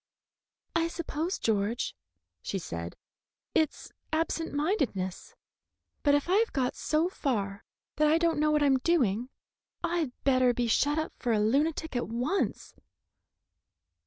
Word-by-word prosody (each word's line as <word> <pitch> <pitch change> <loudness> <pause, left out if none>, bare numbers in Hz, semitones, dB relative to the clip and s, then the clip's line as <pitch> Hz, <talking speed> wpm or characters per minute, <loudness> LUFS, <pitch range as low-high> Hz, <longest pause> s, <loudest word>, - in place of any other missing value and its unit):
"I 330 0 +3
suppose, 335 +1 -3
George," 215 +1 0 0.5
she 195 - -3
said, 85 - -5 0.6
"it's 315 -2 0 0.2
absent 325 +1 -1
mindedness; 280 - -1 0.7
but 285 -1 +4
if 290 - 0
I 370 +3 +4
have 455 +1 +2
got 255 -3 0
so 315 +2 +1
far 205 - -2 0.3
that 305 0 +4
I 310 +2 +5
don't 330 -2 +1
know 305 0 +3
what 300 -1 +3
I'm 270 -2 +4
doing, 250 - +1 0.5
I'd 330 -6 0
better 255 -3 +4
be 245 - +1
shut 285 +6 +2
up 315 - -2
for 240 -2 0
a 215 - +2
lunatic 290 +7 +1
at 245 - -1
once." 250 - -1
285 Hz, 135 wpm, -29 LUFS, 235-320 Hz, 0.7 s, I